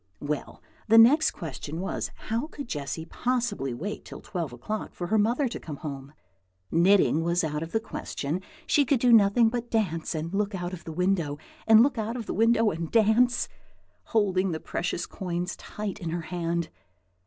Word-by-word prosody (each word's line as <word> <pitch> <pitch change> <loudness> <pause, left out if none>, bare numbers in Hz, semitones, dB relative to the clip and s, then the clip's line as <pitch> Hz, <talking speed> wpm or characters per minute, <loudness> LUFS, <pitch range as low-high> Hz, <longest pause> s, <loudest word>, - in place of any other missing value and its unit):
Well, 145 0 -4 0.2
the 225 +1 +6
next 285 +8 +7
question 160 0 -6
was, 190 - -3 0.2
How 230 +6 0
could 285 -4 -8
Jessy 150 -1 -4
possibly 230 - -1
wait 185 - -5
till - - -9
twelve 170 - -4
o'clock 165 - -5
for 175 - -4
her 215 +5 +2
mother 240 +6 +2
to - - -6
come 150 - -7
home? 140 -1 -7 0.6
Knitting 170 -1 +4
was 170 +1 +1
out 150 -1 -2
of 165 0 -5
the 225 - +1
question. 165 -6 -4 0.2
She 290 - +4
could 270 -1 +2
do 245 0 +5
nothing 225 +2 +6
but 240 0 -4
dance 170 -8 -1
and 160 +3 -4
look 205 0 0
out 175 0 -4
of 170 - -9
window, 165 -3 0 0.3
and 225 0 +8
look 265 -3 +1
out 220 +2 -2
of 230 - -6
window 225 0 +3
and 165 0 -4
dance, 230 +2 +3 0.6
holding 195 -5 +1
the 160 - -3
precious 175 +1 -3
coins 180 -1 -4
tight 210 -2 -6
in 170 - -3
her 170 +1 -2
hand. 170 -1 -2
190 Hz, 175 wpm, -27 LUFS, 165-225 Hz, 0.6 s, and